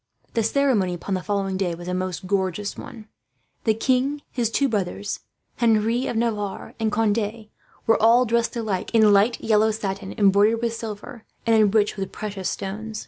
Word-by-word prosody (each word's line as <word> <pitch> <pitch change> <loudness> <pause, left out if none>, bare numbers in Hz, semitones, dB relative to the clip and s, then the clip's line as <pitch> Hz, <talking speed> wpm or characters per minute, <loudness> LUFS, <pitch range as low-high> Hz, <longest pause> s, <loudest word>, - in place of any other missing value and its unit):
The 230 - +1
ceremony 225 -6 +2
upon 190 +3 -5
the 185 - -1
following 195 -1 -1
day 180 -3 -1
was 175 +1 -10
a 180 - -2
most 185 0 -3
gorgeous 195 +1 -1
one. 220 -2 -10 0.6
The 220 -2 +3
king, 265 +5 0
his 235 -3 0
two 275 +4 +1
brothers, 205 -2 -2 0.4
Henri 230 +2 +2
of 230 - -2
Navarre, 215 -4 -2
and 220 -1 0
Conde 215 0 -1 0.4
were 225 - +3
all 235 +3 +5
dressed 235 +1 0
alike 220 -2 -2
in 215 -2 +6
light 210 +4 +3
yellow 220 0 +3
satin, 200 -2 -4
embroidered 205 +3 +4
with 230 -1 0
silver, 220 0 -7 0.2
and 230 - +4
enriched 210 -1 +3
with 195 -1 -4
precious 200 -3 -4
stones. 215 +3 -5
215 Hz, 170 wpm, -23 LUFS, 195-230 Hz, 0.6 s, in